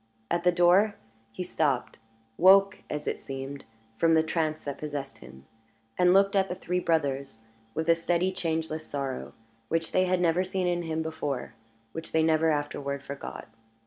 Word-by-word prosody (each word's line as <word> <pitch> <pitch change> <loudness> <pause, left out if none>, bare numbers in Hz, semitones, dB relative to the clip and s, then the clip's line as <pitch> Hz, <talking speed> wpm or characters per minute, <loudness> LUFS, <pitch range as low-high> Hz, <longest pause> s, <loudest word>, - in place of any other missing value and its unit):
At 170 0 +1
the 180 - +5
door 180 +4 +4 0.4
he 145 - -5
stopped 145 -10 -1 0.4
woke, 190 +3 +6
as 150 0 -4
it - - -3
seemed, 135 +1 -7 0.3
from 165 +3 +4
the 160 - +4
trance 160 -1 -1
that 140 -1 -5
possessed 145 -3 -5
him 65 +2 -14 0.5
and 180 0 +4
looked 195 +1 +4
at 195 -1 +2
the 180 - -3
three 180 0 -2
brothers 140 -8 -1 0.3
with 160 +1 -2
a 165 - +7
steady, 175 +2 0
changeless 160 -3 -2
sorrow, 135 -2 -4 0.3
which 165 +3 -1
they 185 - +3
had 185 0 +1
never 175 +1 +2
seen 185 0 -2
in 175 -1 0
him 160 -1 -2
before, 145 -5 -4 0.4
which 165 +4 -7
they 160 0 +3
never 160 0 +3
afterward 140 -2 -2
forgot. 140 0 -7
160 Hz, 170 wpm, -28 LUFS, 145-180 Hz, 0.5 s, a